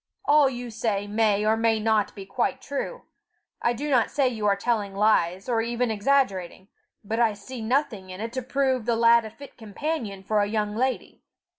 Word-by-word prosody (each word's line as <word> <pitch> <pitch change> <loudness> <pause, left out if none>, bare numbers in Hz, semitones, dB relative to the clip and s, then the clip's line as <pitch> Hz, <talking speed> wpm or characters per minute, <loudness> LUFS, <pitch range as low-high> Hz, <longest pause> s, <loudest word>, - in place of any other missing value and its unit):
All 290 -2 +5
you 245 -2 -6
say 215 -2 -1
may 210 0 +1
or 220 +1 +3
may 225 -1 +2
not 215 -1 +1
be 195 -2 -8
quite 260 +5 -1
true; 285 - -5 0.6
I 240 - +2
do 280 +5 -4
not 255 -6 +3
say 280 -2 +1
you 220 -4 -1
are 200 - +4
telling 205 -2 -1
lies, 195 -3 +2
or 235 -2 +1
even 235 +1 -1
exaggerating; 205 -5 0 0.3
but 220 +3 -3
I 230 -3 +3
see 230 +4 -9
nothing 220 -5 -1
in 185 +1 -8
it 225 +2 -5
to 260 - -2
prove 260 -2 0
the 235 - +2
lad 230 0 +5
a - - -6
fit 280 +5 -14
companion 220 - -4
for 210 +2 +1
a 205 - +2
young 210 -1 -2
lady. 260 +3 -2
225 Hz, 195 wpm, -25 LUFS, 210-255 Hz, 0.6 s, All